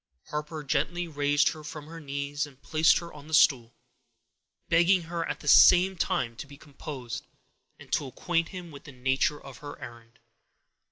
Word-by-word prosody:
Harper 150 +1 -5
gently 175 +5 -1
raised 145 -1 +2
her 155 - -8
from 150 0 -8
her 165 +2 -10
knees, 140 0 -3
and 135 -2 -18
placed 155 +2 +4
her 170 0 -7
on 150 0 -12
the 160 - +1
stool, 120 -6 +4 0.9
begging 175 +2 +4
her 165 0 -3
at 150 - -4
the - - -10
same 185 +5 +7
time 170 -10 -1
to 140 - -8
be 140 0 -13
composed, 140 -4 -8 0.5
and - - -11
to 145 - 0
acquaint 165 +5 -1
him 180 -3 -8
with 140 - -12
the - - -10
nature 135 +3 0
of 135 -3 -12
her 145 -1 -9
errand. 115 -1 -12
150 Hz, 175 wpm, -28 LUFS, 140-165 Hz, 0.9 s, same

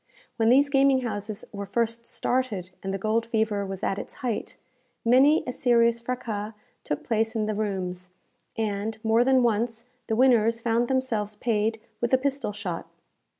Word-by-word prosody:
When 225 -1 +3
these 275 +4 +6
gaming 275 -1 +4
houses 215 -2 -4
were 200 -1 -5
first 235 +1 -1
started, 220 -8 -2
and 195 - -3
the 195 - -1
gold 220 +3 0
fever 220 -3 0
was 190 -1 -6
at 195 - 0
its - - -8
height, 230 -4 -3 0.5
many 270 +7 +5
a 250 - -3
serious 235 -2 +3
fraças 230 -4 -4 0.3
took 150 - -3
place 225 0 0
in 215 -1 0
the 215 - -1
rooms, 185 -4 -3 0.5
and, 215 0 -2
more 225 +2 +4
than 260 0 +4
once, 230 +1 0 0.2
the 220 - 0
winners 230 -2 +4
found 235 +1 +1
themselves 230 -6 -1
paid 220 0 0 0.2
with 240 +1 -1
a - - +3
pistol 275 -3 -1
shot. 205 - -5
225 Hz, 165 wpm, -26 LUFS, 210-245 Hz, 0.5 s, these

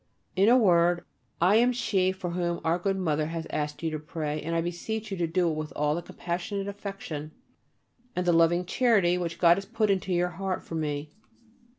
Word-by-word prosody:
In 195 +3 +5
a 250 - +7
word, 175 -5 +3 0.3
I 185 +5 +5
am 245 +2 +4
she 190 -6 +1
for 185 -2 -5
whom 175 -1 -1
our 165 +2 +2
good 195 +2 0
Mother 155 -4 0
has 165 0 -4
asked 150 +1 -3
you 160 - 0
to 155 - -3
pray, 150 -1 -4
and 165 +2 -3
I 165 - +2
beseech 210 +6 -4
you 195 - -2
to 170 -1 0
do 175 +2 +1
it 165 - +1
with 155 -1 -4
all 150 0 +1
the 170 - -2
compassionate 180 +4 -4
affection 195 -7 -6 0.8
and 180 - -1
the 175 - +4
loving 165 +2 +4
charity 195 -5 +3
which 170 -1 -3
God 170 0 +5
has 195 - -4
put 215 -1 +1
into 190 -1 -1
your 180 0 +2
heart 185 +1 -3
for - - -10
me. 150 -2 -3
175 Hz, 210 wpm, -27 LUFS, 165-195 Hz, 0.8 s, a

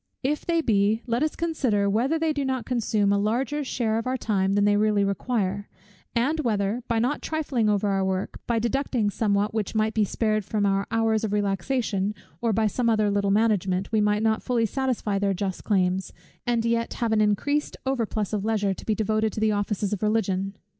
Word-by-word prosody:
If 295 +3 -1
they 335 -1 +2
be, 215 -3 +2
let 235 0 -1
us 310 0 0
consider 260 -12 0
whether 240 +10 +1
they 320 -1 0
do 285 -1 -2
not 260 -2 -2
consume 215 -4 +1
a 200 - +2
larger 250 +8 0
share 225 -4 -1
of 230 - -5
our 260 +1 0
time 195 -5 0
than 205 0 +3
they 205 0 +4
really 210 -1 +2
require; 200 -1 -1 0.5
and 275 +7 +1
whether, 215 -3 0
by 230 - 0
not 250 +6 0
trifling 275 -8 0
over 205 0 +1
our 195 -1 +1
work, 190 0 -2
by 235 - +1
deducting 235 -2 0
somewhat 205 -1 0
which 220 -1 -2
might 215 0 +1
be 215 - +2
spared 215 +1 0
from 205 +1 -1
our 195 0 +1
hours 225 -1 +1
of 210 -2 -1
relaxation, 205 0 -1 0.3
or 230 - +1
by 220 +1 +1
some 235 +3 +1
other 215 -2 +2
little 200 0 +1
management, 195 -3 +1
we 220 -1 +2
might 210 +1 +2
not 220 0 +2
fully 240 -3 +1
satisfy 230 -4 -1
their 200 -1 +1
just 190 0 -3
claims, 190 -2 +1 0.4
and 235 -1 +1
yet 230 0 0
have 235 -2 -1
an 220 -1 +3
increased 285 +8 0
overplus 225 -6 -1
of 205 -2 -1
leisure, 205 -3 +1
to - - -11
be 215 - +2
devoted 215 0 0
to - - -5
the 220 0 +2
offices 205 0 -1
of 205 - -3
Religion. 200 -3 0
215 Hz, 205 wpm, -25 LUFS, 200-235 Hz, 0.5 s, they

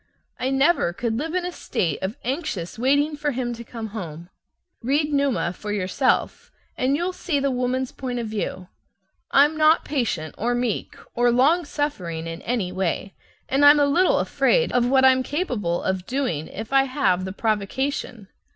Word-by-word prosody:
I 255 - 0
never 270 - +2
could 230 +3 -2
live 325 +4 -3
in 365 -1 0
a 360 - -3
state 165 - -2
of 190 +4 -3
anxious 225 - -3
waiting 285 +4 +2
for 295 -1 -2
him 240 -1 -2
to 235 0 -8
come 225 -1 -7
home. 170 -4 -7 0.5
Read 290 +5 0
"Numa" 275 -11 +1
for 210 +2 -6
yourself, 205 +6 0 0.3
and 260 +2 +1
you'll 350 +4 -1
see 315 -5 -1
the 275 0 0
woman's 255 +1 -1
point 250 -2 -5
of 235 - -2
view. 205 -4 -4 0.6
I'm 290 +3 +4
not 310 +1 +4
patient 215 - -2
or 240 +3 0
meek 245 -3 -2 0.2
or 240 0 +3
long 290 +8 +3
suffering 185 - -3
in 165 0 -6
any 225 -7 -2
way, 190 +1 -2 0.3
and 275 +2 +1
I'm 290 +1 +8
a 290 - +5
little 345 +6 +3
afraid - - +2
of 245 -1 +2
what 265 0 +4
I'm 260 0 +5
capable 250 - -2
of 190 -1 -2
doing 245 - -2
if 220 +5 -7
I 270 0 +5
have 255 -9 +1
the 190 - -4
provocation. 220 +2 -2
250 Hz, 175 wpm, -23 LUFS, 200-285 Hz, 0.6 s, I'm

